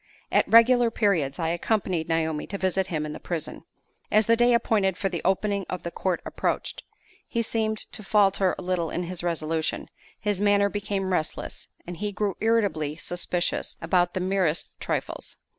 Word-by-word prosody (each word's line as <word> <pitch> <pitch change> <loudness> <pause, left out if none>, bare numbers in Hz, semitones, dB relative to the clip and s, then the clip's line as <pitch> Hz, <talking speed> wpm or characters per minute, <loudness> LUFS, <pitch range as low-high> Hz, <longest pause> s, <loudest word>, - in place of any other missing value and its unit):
At - - +3
regular 235 +1 +7
periods 175 -12 +1
I 165 -1 -1
accompanied 175 -1 0
Naomi 160 -2 0
to 200 - -4
visit 190 0 0
him 155 -4 -2
in 150 - -5
the - - -7
prison. 160 -3 -5 0.5
As 215 0 +4
the 230 - +5
day 240 +1 +4
appointed 200 -5 +1
for 195 - 0
the 175 -2 -3
opening 200 +1 +1
of 180 - -4
the 170 - -4
court 180 -1 -1
approached, - - -2 0.5
he 230 - -1
seemed 220 -1 -1
to - - -5
falter 195 -2 +3
a - - -7
little 180 -2 -1
in 175 - -2
his 175 0 -3
resolution; 160 -2 -1 0.3
his 205 -2 -1
manner 205 0 +4
became 200 -2 -2
restless; 155 -3 -3 0.2
and 175 0 -7
he 210 +2 -2
grew 205 -1 -1
irritably 205 -10 +1
suspicious 175 +2 -2
about 175 -2 +1
the - - 0
merest 185 -4 0
trifles. - - -4
190 Hz, 175 wpm, -26 LUFS, 170-210 Hz, 0.5 s, regular